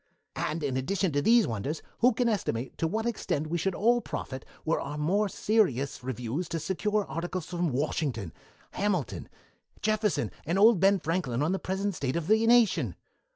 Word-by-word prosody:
And 155 +1 -2
in 135 -2 -1
addition 180 +6 0
to 145 0 +1
these 230 +6 +5
wonders, 120 +8 -3 0.2
who 250 +2 +5
can 245 +2 +1
estimate 130 - -1
to 165 - +1
what 220 +7 -2
extent 205 -10 -1
we 170 +2 -2
should 190 +2 -1
all 240 +3 +3
profit 130 - -5 0.2
were 160 - +1
our 145 +2 -5
more 195 +8 +1
serious 140 - +1
reviews 125 +6 -3
to 165 - -2
secure 205 +5 0
articles 175 +1 -4
from 175 -1 -1
Washington, 130 - -2 0.4
Hamilton, 185 - -2 0.5
Jefferson, 210 - +1
and 170 +4 -1
old 215 0 +6
Ben 195 +2 +5
Franklin 150 -7 -1
on 160 - +1
the 190 - 0
present 195 +2 -2
state 135 -5 -2
of 170 -2 -1
the 220 +4 +3
nation! 235 -4 +4
175 Hz, 175 wpm, -28 LUFS, 145-210 Hz, 0.5 s, old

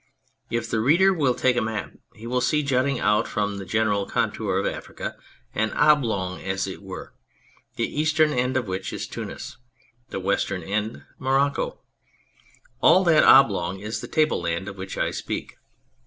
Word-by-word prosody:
If 115 -1 -2
the 115 - -1
reader 170 - +4
will 140 -8 +1
take 130 -1 +2
a 120 - +1
map 110 -1 -3 0.2
he 110 - -11
will 125 +1 0
see 150 +2 +2
jutting 135 -1 +1
out 105 +1 +2
from 100 -1 -2
the 95 - -7
general 105 0 +1
contour - - -1
of - - 0
Africa, - - -5 0.4
an 110 +1 0
oblong 115 -12 +2
as 95 0 -2
it 95 0 -7
were, 95 -1 -9 0.6
the - - 0
eastern 155 0 +2
end 125 +1 0
of 125 -4 -2
which 95 0 -4
is - - -4
Tunis, - - -7 0.5
the - - -4
western 95 -1 -1
end 105 +5 -3 0.2
Morocco. 135 +2 0 1.0
All 185 - +6
that 165 -4 +5
oblong 95 -9 +5
is 105 +3 -4
the - - -7
tableland 90 - 0
of 100 - -6
which 95 0 -7
I - - 0
speak. - - -5
110 Hz, 165 wpm, -24 LUFS, 100-140 Hz, 1.0 s, All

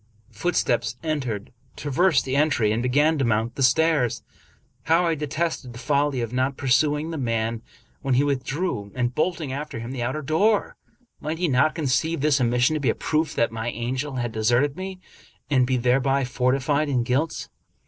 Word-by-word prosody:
Footsteps 120 -2 0
entered, 130 -10 -3 0.2
traversed 150 +2 +2
the 130 0 -2
entry, 140 -8 +2
and 110 +2 0
began 145 +5 +2
to - - +2
mount 115 0 0
the 135 - -5
stairs. 135 -3 +2 0.6
How 165 +2 +3
I 165 - +2
detested 150 -3 -3
the - - -10
folly 140 +1 0
of 115 0 -4
not 130 +2 0
pursuing 150 +4 +1
the 160 - -4
man 115 -2 -1 0.4
when 135 -2 +1
he 135 - +4
with 140 -3 0
drew, 135 - -3
and 125 -1 -1
bolting 155 -3 -1
after 145 -2 -5
him 115 +2 -6
the 130 -2 -4
outer 130 +6 -2
door! 200 +9 +1 0.4
Might 155 +2 -3
he 175 +1 0
not 140 +2 +2
conceive 160 +1 0
this 145 -2 +3
omission 125 +4 +2
to 155 - 0
be 135 -5 +1
a - - +1
proof 155 -1 -1
that 115 - +1
my 115 +1 -3
angel 130 +5 -3
had 120 -2 -2
de 110 - -5
serted 120 +6 +2
me, 190 0 -6 0.5
and 130 -3 +3
be 130 0 +1
thereby 135 +3 +2
fortified 135 +4 +1
in 125 -4 +1
guilt? 135 +6 -1
135 Hz, 185 wpm, -24 LUFS, 120-155 Hz, 0.6 s, he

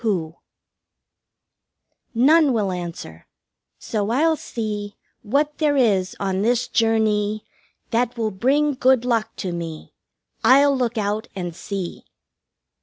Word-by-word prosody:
Who? 175 -8 -2 1.8
3 235 +1 +1
None 305 -1 +5
will 205 -4 0
answer. 170 - -7 0.5
So 210 -2 -3
I'll 315 +7 +3
see 210 -6 -5 0.3
What 285 +7 0
there 295 -2 +2
is 200 -7 +2
on 190 -1 -1
this 240 +3 +1
journey 215 -2 +1
(journee) - - -39
That 245 +1 0
will 220 -2 -1
bring 280 +9 +1
good 255 -2 +3
luck 225 -2 0
to 185 - -4
me 165 -2 -7 0.5
I'll 275 +4 +6
look 245 -2 -1
out 210 +1 -1
and 175 -3 -5
see! 190 -2 -6
220 Hz, 125 wpm, -22 LUFS, 195-255 Hz, 1.8 s, I'll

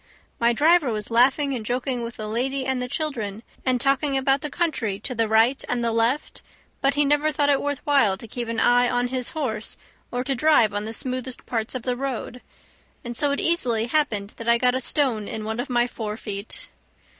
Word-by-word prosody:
My 235 0 +4
driver 300 +2 +4
was 215 0 -2
laughing 270 +4 +3
and 240 -4 -3
joking 245 +2 -2
with 235 0 -6
the 215 - -5
lady 260 +5 -1
and 260 -1 0
the 250 - -2
children, 235 -8 -3 0.2
and 255 -1 +1
talking 275 +1 +2
about 270 +1 +2
the 300 - -3
country 260 - -1
to 255 - -3
the 225 -2 0
right 225 +5 +3
and 245 -1 0
the 230 - +1
left; 230 +6 0 0.4
but 275 0 +2
he 290 0 +3
never 295 +2 +2
thought 290 -1 +1
it 275 - +2
worth 285 -1 -3
while 250 -10 +4
to 230 - -10
keep 240 +2 -5
an 230 0 -2
eye 245 0 +4
on 245 0 0
his 255 -1 -1
horse 220 -8 -2 0.3
or 245 0 -2
to 270 - -1
drive 250 -6 +4
on 205 +1 -2
the 220 - -5
smoothest 255 +1 -3
parts 225 0 -2
of 250 - -4
the 250 -1 -1
road; 250 -1 -4 0.6
and 240 0 -5
so 290 +4 +2
it 280 - 0
easily 245 -10 +1
happened 235 -7 0
that 230 0 -3
I 235 - +6
got 250 +1 +2
a 260 - -1
stone 240 -7 +1
in 220 - -5
one 220 +2 -4
of 270 - -3
my 240 -1 +2
fore 220 -3 -5
feet. 205 -2 -6
245 Hz, 220 wpm, -24 LUFS, 225-275 Hz, 0.6 s, I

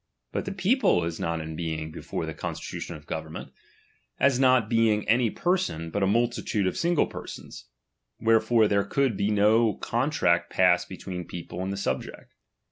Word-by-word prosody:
But - - -3
the - - -3
people 195 - +2
is 85 -1 -4
not 85 0 -2
in 80 0 -6
being 80 -1 -4
before - - -5
the - - -5
con - - -5
stitution 85 - -6
of 75 -1 -12
government, 80 0 -6 0.7
as 135 -2 +3
not 130 -4 +4
being 110 -2 +2
any 115 +1 +3
person, 175 - -1
but 100 - -2
a 95 - +3
multitude 115 -1 0
of 95 - 0
single 170 -2 +2
persons; - - -9 0.5
wherefore 115 0 +4
there 100 -1 +2
could 130 0 0
then 105 +1 +1
no 110 +2 +4
contract 120 - +1
pass 90 -1 +4
between 90 0 -7
the 90 - -6
people 85 +1 -7
and 95 +1 -2
the 100 - -4
subject. 65 -10 -4
105 Hz, 175 wpm, -26 LUFS, 85-120 Hz, 0.7 s, not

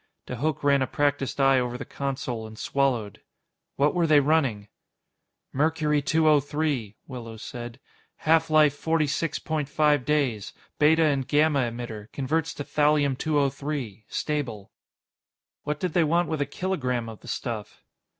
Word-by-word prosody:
De 125 - -6
Hooch 150 +3 -1
ran 140 -1 +4
a 130 - +1
practiced 145 -1 -1
eye 135 -1 +5
over 125 0 -2
the - - -7
console 130 -5 -4
and 110 0 -12
swallowed. 125 -7 -1 0.5
"What 145 +2 +2
were 175 -2 +2
they 150 -2 +6
running?" 135 -8 +1 0.9
"Mercury 150 +1 +1
203," 145 -6 +1
Willows 115 -4 -8
said. 120 0 -7 0.4
"Half 160 +1 +2
life 155 -2 +5
forty 160 +1 +1
six 150 +2 -1
point 155 -3 -3
five 150 -3 +3
days. 130 -7 0 0.3
Beta 160 +2 +5
and 140 -4 +1
gamma 145 -4 +3
emitter. 115 -3 -7
Converts 160 +4 -1
to 145 - -4
Thallium 145 -2 +2
203, 140 -6 -2
stable." 125 -10 -3 0.9
"What 150 0 -2
did 180 -1 -2
they 175 - +4
want 170 +3 +1
with 160 -2 -2
a 140 - 0
kilogram 135 -8 -2
of 110 -2 -9
the - - -15
stuff?" 115 -5 -5
145 Hz, 150 wpm, -26 LUFS, 125-155 Hz, 0.9 s, they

